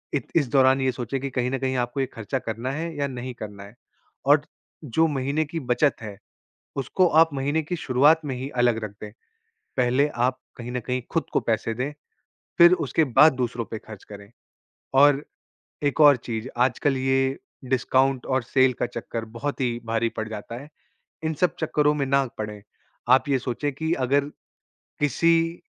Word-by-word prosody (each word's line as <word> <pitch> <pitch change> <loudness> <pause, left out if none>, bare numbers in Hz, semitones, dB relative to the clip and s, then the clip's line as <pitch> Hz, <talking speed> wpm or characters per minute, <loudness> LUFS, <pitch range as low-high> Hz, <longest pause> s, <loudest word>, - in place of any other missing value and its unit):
इत 140 - -2
इस 145 -5 +2
दौरान 135 0 +4
ये 130 -1 +2
सोचें 125 +2 -4
कि 140 - -3
कहीं 125 -1 -1
न 135 - 0
कहीं 130 -1 -1
आपको 120 +3 -5
ये 135 - +2
ख़र्चा 115 +4 -3
करना 115 +3 -4
है 165 +3 -4
या 140 -1 -1
नहीं 125 -1 -6
करना 100 -2 -8
है 100 +3 -14 0.5
और 145 +1 +5 0.4
जो 160 +4 +2
महीने 145 +2 -1
की 165 +3 -5
बचत 130 +2 +1
है, 105 -3 -8 0.6
उसको 140 +7 +1
आप 165 - +5
महीने 145 +4 0
की 175 +4 -3
शुरुआत 150 +2 +3
में 135 -3 -3
ही 130 +2 -5
अलग 120 -2 +3
रख 105 - -5
दें। 105 -1 -7 0.7
पहले 130 +3 +2 0.2
आप 130 0 -2 0.2
कहीं 120 0 -7
न 125 - -2
कहीं 125 +2 -3
खुद 165 - +1
को - - +2
पैसे 115 0 -1
दें, 135 +5 -3 0.7
फिर 170 +1 +8
उसके 155 +5 +2
बाद 155 -1 +8
दूसरों 120 -2 -2
पे 110 - -6
खर्च 105 -3 -12
करें, 100 0 -12 0.6
और 145 +1 +5 0.6
एक 145 +2 0
और 145 -3 +8
चीज़, 115 +1 -5
आजकल 130 +3 +1
ये 135 +1 +1 0.3
डिस्काउंट 130 +1 +1
और 130 -1 0
सेल 130 +2 +3
का - - +2
चक्कर 115 -1 -6
बहुत 145 +2 -3
ही 120 -2 0
भारी 115 0 0
पड़ 110 0 -2
जाता 110 +1 -7
है, 150 - -13 0.6
इन 160 0 -1
सब 180 +4 +1
चक्करों 150 -1 +2
में 140 -2 -1
ना 135 0 +2
पड़ें। 105 -1 -5 0.5
आप 130 +2 +1
ये 135 - +2
सोचें 130 +4 -3
कि 160 +4 -2
अगर 140 +2 +2 0.8
किसी 165 +4 +2
130 Hz, 185 wpm, -24 LUFS, 120-145 Hz, 0.8 s, फिर